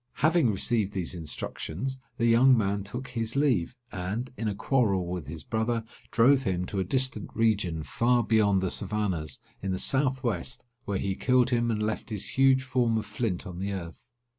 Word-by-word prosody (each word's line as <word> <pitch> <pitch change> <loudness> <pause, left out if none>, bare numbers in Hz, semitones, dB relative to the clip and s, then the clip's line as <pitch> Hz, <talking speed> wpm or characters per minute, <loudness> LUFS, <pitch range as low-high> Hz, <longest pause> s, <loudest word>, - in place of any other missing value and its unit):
Having 155 -2 +3
received 105 0 0
these 95 -2 -2
instructions, 90 - -5 0.2
the 115 - +1
young 120 +3 +6
man 100 -2 0
took 125 +6 -6
his 115 -1 -3
leave, 125 - +1 0.2
and, 100 +7 -4
in 115 - -3
a 105 - -1
quarrel 105 -6 +1
with 90 -5 -5
his 75 +1 -7
brother, 115 +1 -1 0.3
drove 130 +4 +5
him 90 -6 -1
to 95 - -3
a - - +2
distant 130 0 +1
region, 100 -8 +1
far 120 +7 +2
beyond 105 -3 +3
the 95 - -1
Savannahs, 95 -8 -2 0.2
in 95 - -2
the 95 - -1
south 130 +3 +2
west, 125 +2 -2 0.2
where 100 -1 -1
he 95 0 -1
killed 125 +4 +2
him, 120 -1 +2
and 105 -2 0
left 110 +2 -2
his 105 -3 -2
huge 135 -1 +4
form 125 -3 +1
of 110 - -2
flint 105 -4 -3
on 90 -3 -7
the 100 +1 -2
earth. 85 -3 -8
110 Hz, 190 wpm, -28 LUFS, 95-125 Hz, 0.3 s, young